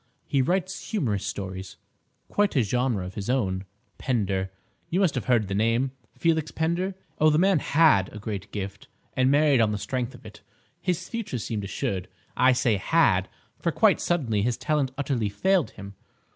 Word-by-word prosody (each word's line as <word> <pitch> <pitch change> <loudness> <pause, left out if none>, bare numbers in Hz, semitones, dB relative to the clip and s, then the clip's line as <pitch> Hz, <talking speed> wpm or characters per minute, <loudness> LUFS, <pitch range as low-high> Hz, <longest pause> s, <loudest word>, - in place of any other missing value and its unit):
He 135 - +1
writes 185 +6 -1
humorous 115 - -1
stories—quite 95 - -4
a 130 - +4
genre 120 -3 0
of 90 - -7
his 100 +2 -5
own: 95 -7 0 0.3
Pender—you 95 - -2
must 185 -6 +3
have - - -3
heard 120 -5 +2
the 95 - -3
name—Felix 130 +8 0
Pender? 175 +4 -1 0.2
Oh, 155 - +6
the 150 - +3
man 190 0 +4
had 145 - +4
a - - -9
great 105 -1 -5
gift, 100 -1 -6 0.3
and 130 0 +3
married 145 -3 +4
on 110 -2 +3
the 105 - -1
strength 125 +3 -3
of - - -16
it; 105 0 -12 0.4
his 180 -3 -1
future 230 - -4
seemed 105 -2 -3
assured. 95 -1 -3 0.3
I 130 - +5
say 120 -4 +2
'had,' 95 - +2 0.3
for - - 0
quite - - +3
suddenly 125 -12 0
his 120 +2 0
talent 150 -3 0
utterly 130 -7 -1
failed 185 - +2
him. 100 0 -10
125 Hz, 165 wpm, -26 LUFS, 100-155 Hz, 0.4 s, Oh